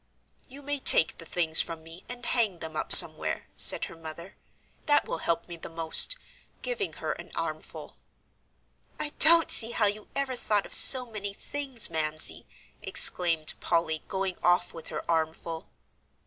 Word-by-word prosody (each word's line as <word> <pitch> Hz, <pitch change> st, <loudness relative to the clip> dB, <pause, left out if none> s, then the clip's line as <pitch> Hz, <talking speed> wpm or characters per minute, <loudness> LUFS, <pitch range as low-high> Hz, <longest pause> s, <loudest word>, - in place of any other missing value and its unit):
"You 280 Hz, +3 st, -13 dB
may 290 Hz, 0 st, -5 dB
take 160 Hz, -, +3 dB
the 165 Hz, -, -12 dB
things 165 Hz, -2 st, +1 dB
from 165 Hz, -1 st, -8 dB
me, 165 Hz, +2 st, -15 dB
and 245 Hz, -1 st, -10 dB
hang 220 Hz, -7 st, -2 dB
them 160 Hz, -1 st, -10 dB
up -, -, -6 dB
somewhere," -, -, +8 dB
said -, -, +4 dB
her -, -, -14 dB
mother; 165 Hz, +2 st, -11 dB, 0.5 s
"that 290 Hz, -1 st, 0 dB
will -, -, -6 dB
help 170 Hz, +1 st, -4 dB
me 170 Hz, -1 st, -10 dB
the -, -, -11 dB
most," 165 Hz, -, +1 dB, 0.5 s
giving 465 Hz, -6 st, -5 dB
her -, -, -7 dB
an -, -, -11 dB
armful. -, -, -9 dB, 1.0 s
"I 295 Hz, -, -4 dB
don't 330 Hz, +1 st, +4 dB
see 225 Hz, -, +1 dB
how 215 Hz, -, -1 dB
you 205 Hz, +1 st, -5 dB
ever 275 Hz, -2 st, -4 dB
thought 210 Hz, -4 st, -3 dB
of -, -, -3 dB
so 255 Hz, -2 st, +8 dB
many 205 Hz, -3 st, -8 dB
things, 265 Hz, -8 st, -6 dB
Mamsie!" 155 Hz, -1 st, -3 dB, 0.3 s
exclaimed 165 Hz, -3 st, 0 dB
Polly 165 Hz, -2 st, -3 dB
going 190 Hz, -1 st, -6 dB
off 175 Hz, 0 st, -1 dB
with 165 Hz, -, -12 dB
her 155 Hz, -, -9 dB
armful. 160 Hz, 0 st, -5 dB
175 Hz, 160 wpm, -25 LUFS, 165-245 Hz, 1.0 s, somewhere